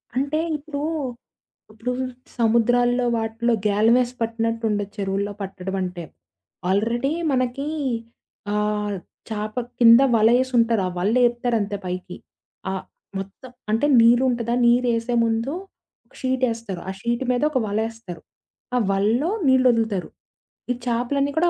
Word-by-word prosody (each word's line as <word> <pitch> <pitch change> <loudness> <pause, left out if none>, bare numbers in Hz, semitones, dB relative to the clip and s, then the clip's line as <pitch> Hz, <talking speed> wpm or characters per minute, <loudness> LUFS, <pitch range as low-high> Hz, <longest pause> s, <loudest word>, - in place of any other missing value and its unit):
అంటే 280 +4 0 0.2
ఇప్పుడు, 285 -1 -6 0.9
ఇప్పుడు 225 +3 -4 0.5
సముద్రాల్లో, 245 +2 +3
వాటిలో 225 +1 0
గ్యాలమేసి 230 +4 +3
పట్టినట్టు 230 0 -1
ఉండొదు 205 -1 -2
చెరువుల్లో 200 +1 -2
పట్టడమంటే. 185 -2 -4 0.7
ఆల్రెడీ 235 +8 +1 0.2
మనకి 255 +2 -1 0.9
ఆహ్, 210 -1 0 0.3
చాప 215 -1 -4 0.2
కింద 230 +1 +8
వలఏసుంటారు. 230 0 +3
ఆ - - -2
వల్లేపుతారంతే 235 -1 +1
పైకి. 180 0 -5 0.5
ఆహ్, 190 -1 -4 0.4
మొత్తం 195 +6 -9 0.2
అంటే 225 +6 +2 0.2
నీరుంటదా? 235 0 +3
నీరేసే 240 0 +2
ముందు 230 +4 -1 0.7
షీటేస్తారు. 230 -7 -1
ఆ - - -1
షీట్ 235 +3 -1
మీదోక 280 +3 +1
వలేస్తారు. 215 -4 -4 0.5
ఆ - - +3
వల‌లో 220 - +1 0.2
నీళ్ళొదులుతారు. 230 -7 +3 0.6
ఈ - - +3
చేపలన్నీ 265 +4 0
కూడా 345 +2 +4
230 Hz, 100 wpm, -23 LUFS, 210-250 Hz, 0.9 s, కింద